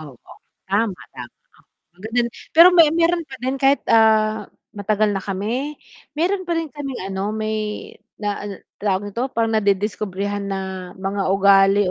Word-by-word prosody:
Opo. 140 Hz, -6 st, -13 dB, 0.4 s
Tama, 200 Hz, -1 st, 0 dB, 0.2 s
tama, -, -, -8 dB, 0.5 s
oh 175 Hz, -, -48 dB
ang -, -, -18 dB
ganda 240 Hz, +2 st, 0 dB
no'n. 235 Hz, -, -2 dB, 0.3 s
Pero 335 Hz, +2 st, +10 dB
may 335 Hz, -3 st, +7 dB
mayro'n 335 Hz, 0 st, +2 dB
pa 265 Hz, -, -9 dB
din 265 Hz, +1 st, -1 dB
kahit, 275 Hz, +1 st, +3 dB
ah, 220 Hz, -2 st, +3 dB, 0.2 s
matagal 210 Hz, 0 st, 0 dB
na 195 Hz, -, -1 dB
kami, 220 Hz, +10 st, -3 dB, 0.4 s
mayro'n 370 Hz, +3 st, 0 dB
pa 340 Hz, -, 0 dB
rin 325 Hz, -3 st, -3 dB
kaming 275 Hz, -6 st, -6 dB
ano 195 Hz, +2 st, -3 dB
may 215 Hz, -1 st, -3 dB, 0.3 s
na 205 Hz, -1 st, -1 dB
an -, -, -5 dB, 0.3 s
tawag 200 Hz, -1 st, 0 dB
nito 245 Hz, +5 st, -2 dB
parang 225 Hz, -1 st, +1 dB
nadidiskubrehan 205 Hz, -1 st, -1 dB
na 195 Hz, -1 st, -2 dB, 0.4 s
mga 195 Hz, +1 st, -3 dB
ugali. 195 Hz, 0 st, +5 dB
215 Hz, 160 wpm, -21 LUFS, 200-265 Hz, 0.5 s, Pero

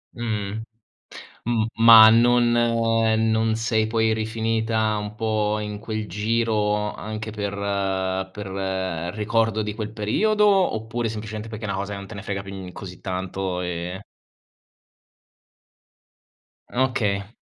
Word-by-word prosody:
Mh-mh. 110 Hz, -2 st, -3 dB, 0.8 s
Mhmm, 115 Hz, -2 st, +1 dB, 0.2 s
ma 115 Hz, -1 st, +10 dB
non 120 Hz, +1 st, +4 dB
non 115 Hz, -1 st, +2 dB
sei 110 Hz, -1 st, 0 dB
poi 110 Hz, 0 st, +2 dB
rifinita 110 Hz, 0 st, 0 dB
un 105 Hz, 0 st, -5 dB
po' 110 Hz, -1 st, 0 dB
in 105 Hz, -1 st, -5 dB
quel 110 Hz, -1 st, -4 dB
giro 105 Hz, -1 st, 0 dB
anche 110 Hz, +1 st, -6 dB
per 100 Hz, -1 st, -3 dB, 0.8 s
per 105 Hz, -1 st, -7 dB, 0.7 s
ricordo 110 Hz, 0 st, +1 dB
di 105 Hz, 0 st, -3 dB
quel 110 Hz, -1 st, -4 dB
periodo, 210 Hz, -, +1 dB
oppure 120 Hz, -, +1 dB
semplicemente 110 Hz, 0 st, -6 dB
perché 110 Hz, 0 st, -6 dB
è -, -, -3 dB
una 100 Hz, -, -2 dB
cosa 100 Hz, +1 st, -4 dB
che -, -, -5 dB
non 100 Hz, -, -8 dB
te -, -, -9 dB
ne 100 Hz, -, -6 dB
frega 100 Hz, -2 st, -4 dB
più, 95 Hz, 0 st, -9 dB
mhmm, 95 Hz, -2 st, -7 dB
così 90 Hz, -2 st, -9 dB
tanto 95 Hz, 0 st, -3 dB
e 90 Hz, +2 st, -4 dB, 2.7 s
Okay. 110 Hz, -5 st, 0 dB
110 Hz, 125 wpm, -23 LUFS, 105-115 Hz, 2.7 s, ma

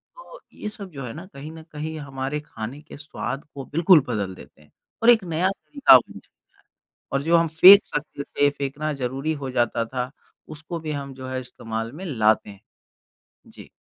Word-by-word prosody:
तो -, -, -13 dB
ये 210 Hz, -, -6 dB
सब 200 Hz, -4 st, -9 dB
जो 135 Hz, -3 st, -7 dB
है 115 Hz, -, -6 dB
ना 170 Hz, +4 st, -9 dB
कहीं 145 Hz, +3 st, -8 dB
न 160 Hz, 0 st, -11 dB
कहीं 155 Hz, +1 st, -5 dB
हमारे 135 Hz, +1 st, -4 dB
खाने 130 Hz, +1 st, -8 dB
के 150 Hz, -, -12 dB
स्वाद 145 Hz, -2 st, -5 dB
को 135 Hz, -1 st, -6 dB
बिल्कुल 170 Hz, +2 st, +5 dB
बदल 100 Hz, -5 st, -3 dB
देते 75 Hz, -, -16 dB
हैं, 75 Hz, -, -23 dB, 0.3 s
और 240 Hz, -, +6 dB
एक 225 Hz, -5 st, +6 dB
नया 175 Hz, +2 st, 0 dB
तरीका 280 Hz, +8 st, +5 dB
बन -, -, -6 dB
जाता -, -, -13 dB
है। -, -, -64 dB, 0.7 s
और 135 Hz, +1 st, 0 dB
जो 170 Hz, +1 st, +4 dB
हम 165 Hz, 0 st, +2 dB
फेंक 185 Hz, +6 st, +8 dB
सकते 150 Hz, -1 st, -5 dB
थे 145 Hz, 0 st, +1 dB
फेंकना 145 Hz, +2 st, -3 dB
ज़रूरी 135 Hz, +4 st, -2 dB
हो 130 Hz, -, -4 dB
जाता 120 Hz, -2 st, 0 dB
था 125 Hz, +2 st, -4 dB, 0.4 s
उसको 160 Hz, +2 st, -7 dB
भी 155 Hz, -1 st, -4 dB
हम 140 Hz, -2 st, -5 dB
जो 130 Hz, 0 st, -9 dB
है 130 Hz, 0 st, -3 dB
इस्तेमाल 115 Hz, -2 st, -5 dB
में 185 Hz, +5 st, -8 dB
लाते 110 Hz, -8 st, +2 dB
हैं। 100 Hz, -1 st, -12 dB, 0.9 s
जी। -, -, -14 dB
145 Hz, 200 wpm, -24 LUFS, 130-160 Hz, 0.9 s, फेंक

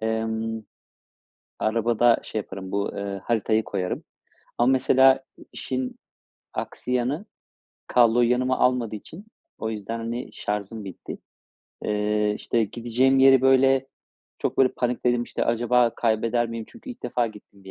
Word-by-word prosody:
emm, 110 Hz, 0 st, -2 dB, 1.0 s
arabada 115 Hz, +1 st, +3 dB
şey 110 Hz, -, -4 dB
yaparım, 95 Hz, -2 st, -7 dB
bu, 100 Hz, 0 st, -1 dB
eee, 100 Hz, -1 st, -4 dB
haritayı 110 Hz, -1 st, +1 dB
koyarım. 95 Hz, -2 st, -3 dB, 0.5 s
Ama, 120 Hz, +2 st, +4 dB
mesela, 130 Hz, 0 st, +5 dB, 0.3 s
işin 130 Hz, -1 st, -4 dB, 0.6 s
aksi 125 Hz, -, -5 dB
yanı 130 Hz, -, 0 dB, 0.6 s
kabloyu 120 Hz, 0 st, +4 dB
yanıma 130 Hz, +1 st, +1 dB
almadığı 125 Hz, -4 st, +1 dB
için 165 Hz, -, -11 dB, 0.3 s
o 110 Hz, -, -3 dB
yüzden, 110 Hz, +1 st, -4 dB
hani, 115 Hz, +2 st, -4 dB
şarjım 105 Hz, +1 st, -4 dB
bitti. 95 Hz, -, -8 dB, 0.7 s
Eee, 105 Hz, 0 st, +1 dB
işte, 115 Hz, -2 st, 0 dB
gideceğim 120 Hz, +5 st, +1 dB
yeri, 135 Hz, -1 st, +7 dB
böyle, 135 Hz, 0 st, +4 dB, 0.5 s
çok, -, -, -2 dB
böyle, 130 Hz, -1 st, +6 dB
panikledim, 120 Hz, 0 st, 0 dB
işte, -, -, -3 dB
"Acaba 120 Hz, 0 st, +2 dB
kaybeder 115 Hz, +1 st, +1 dB
miyim?" 115 Hz, -1 st, -5 dB
Çünkü 235 Hz, +3 st, -11 dB
ilk 250 Hz, -, -11 dB
defa 120 Hz, -1 st, 0 dB
gittiğim 105 Hz, -2 st, -13 dB
bir 95 Hz, -, -10 dB
115 Hz, 130 wpm, -25 LUFS, 110-125 Hz, 1.0 s, yeri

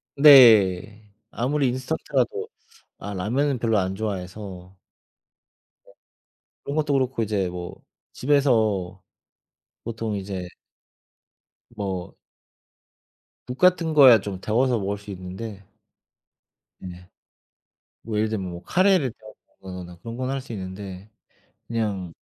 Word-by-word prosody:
네. 105 Hz, -7 st, +6 dB, 0.2 s
아무리 135 Hz, +3 st, 0 dB
인스턴트라도 160 Hz, -, -2 dB, 0.5 s
아 100 Hz, -, -6 dB
라면은 125 Hz, +8 st, -1 dB
별로 115 Hz, -2 st, +1 dB
안 95 Hz, +1 st, -2 dB
좋아해서. 95 Hz, -2 st, -6 dB, 1.1 s
어. -, -, -20 dB, 0.7 s
그런 140 Hz, -, -4 dB
것도 150 Hz, -2 st, 0 dB
그렇고 130 Hz, -3 st, 0 dB
이제 100 Hz, -4 st, -1 dB
뭐 90 Hz, 0 st, -7 dB, 0.4 s
집에서 110 Hz, -10 st, +1 dB, 0.8 s
보통 110 Hz, -2 st, -4 dB
이제 95 Hz, -2 st, -5 dB, 1.3 s
뭐 95 Hz, -4 st, -5 dB, 1.3 s
국 125 Hz, +1 st, -7 dB
같은 180 Hz, -3 st, +3 dB
거야 130 Hz, -6 st, +8 dB
좀 95 Hz, -3 st, -6 dB
데워서 120 Hz, +2 st, +1 dB
먹을 100 Hz, +1 st, -3 dB
수 100 Hz, 0 st, -10 dB
있는데. 95 Hz, +3 st, -8 dB, 1.2 s
네. 90 Hz, 0 st, -10 dB, 0.9 s
뭐 110 Hz, -2 st, -4 dB
예를 110 Hz, +1 st, +1 dB
들면 95 Hz, -4 st, -3 dB
뭐 85 Hz, +1 st, -9 dB
카레를 185 Hz, -, +2 dB
데운다거나 90 Hz, -5 st, -12 dB
그런 115 Hz, +6 st, -8 dB
건 130 Hz, 0 st, -3 dB
할 135 Hz, 0 st, -2 dB
수 125 Hz, -, -9 dB
있는데 95 Hz, 0 st, -8 dB, 0.6 s
'그냥 100 Hz, -7 st, -2 dB
105 Hz, 215 characters per minute, -24 LUFS, 95-130 Hz, 1.3 s, 거야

